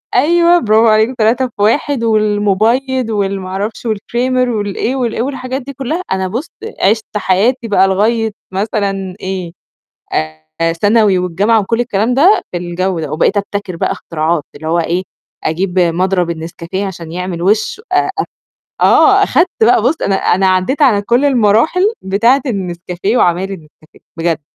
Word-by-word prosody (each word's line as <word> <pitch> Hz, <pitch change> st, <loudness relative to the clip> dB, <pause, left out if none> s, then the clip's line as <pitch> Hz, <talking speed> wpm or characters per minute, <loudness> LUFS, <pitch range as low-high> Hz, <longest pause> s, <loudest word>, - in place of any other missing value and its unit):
أيوه، 340 Hz, +6 st, +4 dB
برافو 220 Hz, 0 st, +3 dB
عليك، 220 Hz, +4 st, +3 dB
3 235 Hz, +4 st, +2 dB
في 210 Hz, -4 st, -9 dB
1 245 Hz, +4 st, +1 dB
والمُبيِّض 220 Hz, +4 st, +1 dB
وال 200 Hz, -2 st, -1 dB
ما 185 Hz, -, -7 dB
أعرفش 205 Hz, +5 st, -4 dB
والكريمر 245 Hz, +4 st, -1 dB
والإيه 215 Hz, +3 st, -2 dB
والإيه 235 Hz, -3 st, -1 dB
والحاجات 260 Hz, 0 st, -4 dB
دي 280 Hz, +2 st, -8 dB
كُلّها، 275 Hz, +6 st, -3 dB
أنا 190 Hz, 0 st, 0 dB
بُص، 240 Hz, -, -4 dB, 0.3 s
عِشْت 215 Hz, +1 st, +1 dB
حياتي 225 Hz, +6 st, +1 dB
بقى 195 Hz, -3 st, +3 dB
لغاية 220 Hz, +3 st, +1 dB, 0.2 s
مثلًا 195 Hz, -2 st, -2 dB
إيه، 185 Hz, -2 st, -4 dB, 1.1 s
آآ 165 Hz, 0 st, +2 dB
ثانوي 205 Hz, +2 st, +3 dB
والجامعة 195 Hz, +6 st, +1 dB
وكل 230 Hz, +4 st, -1 dB
الكلام 230 Hz, +1 st, 0 dB
ده 355 Hz, +10 st, +4 dB
في -, -, -3 dB
الجَو 175 Hz, 0 st, -2 dB
ده 150 Hz, -2 st, -5 dB
وبقيت 170 Hz, +6 st, +1 dB
أبتكر 200 Hz, -2 st, -3 dB
بقى -, -, -1 dB
اختراعات 160 Hz, -1 st, -2 dB
اللي 155 Hz, +2 st, -9 dB
هو 170 Hz, -, +1 dB
إيه، 175 Hz, +3 st, -1 dB, 0.4 s
أجيب 180 Hz, +3 st, -1 dB
مضرب 180 Hz, 0 st, +1 dB
النسكافيه 170 Hz, +4 st, -5 dB
عشان 170 Hz, -4 st, -8 dB
يعمل 180 Hz, -1 st, -4 dB
وِش 215 Hz, -, +1 dB
آآ -, -, +2 dB
أ 400 Hz, -, +2 dB, 0.6 s
آه، -, -, +5 dB
أخدت 350 Hz, -, +2 dB
بقى 225 Hz, -1 st, +4 dB
بُص، 265 Hz, +8 st, +2 dB
أنا 195 Hz, -, +1 dB
أنا 190 Hz, 0 st, +2 dB
عدّيت 185 Hz, +11 st, +1 dB
على 220 Hz, -8 st, +4 dB
كل 240 Hz, +6 st, +1 dB
المراحل 275 Hz, -, +3 dB
بتاعة 230 Hz, +8 st, +2 dB
النسكافيه 185 Hz, 0 st, -2 dB
وعمايل 185 Hz, 0 st, +1 dB
النسكافيه 155 Hz, -3 st, -13 dB, 0.2 s
بجد. 165 Hz, -1 st, -1 dB
205 Hz, 155 wpm, -14 LUFS, 185-240 Hz, 1.1 s, آه